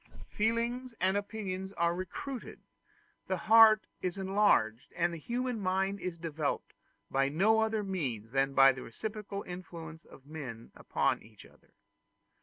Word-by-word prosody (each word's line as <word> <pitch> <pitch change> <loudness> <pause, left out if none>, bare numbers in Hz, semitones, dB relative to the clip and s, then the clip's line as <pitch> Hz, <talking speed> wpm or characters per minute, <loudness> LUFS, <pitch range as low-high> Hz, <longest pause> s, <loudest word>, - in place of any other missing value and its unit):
Feelings 235 +3 0
and 190 +2 +2
opinions 195 -2 -3
are 170 -2 +1
recruited, 185 +8 -6 0.7
the 185 - 0
heart 220 +2 +7 0.2
is 180 0 -2
enlarged, 190 - +2
and 175 0 +1
the 165 - -6
human 245 +5 -2
mind 195 +1 0
is 180 -2 -4
developed 160 -3 -3 0.4
by 135 0 +2
no 205 +9 +3
other 220 -1 +1
means 130 - -3
than 135 +1 +1
by 135 0 +8
the 130 -1 -7
reciprocal 210 - -6
influence 170 -3 -8
of 135 - -16
men 135 -7 -8
upon - - 0
each 110 -2 -16
other. - - -22
185 Hz, 140 wpm, -31 LUFS, 150-215 Hz, 0.7 s, by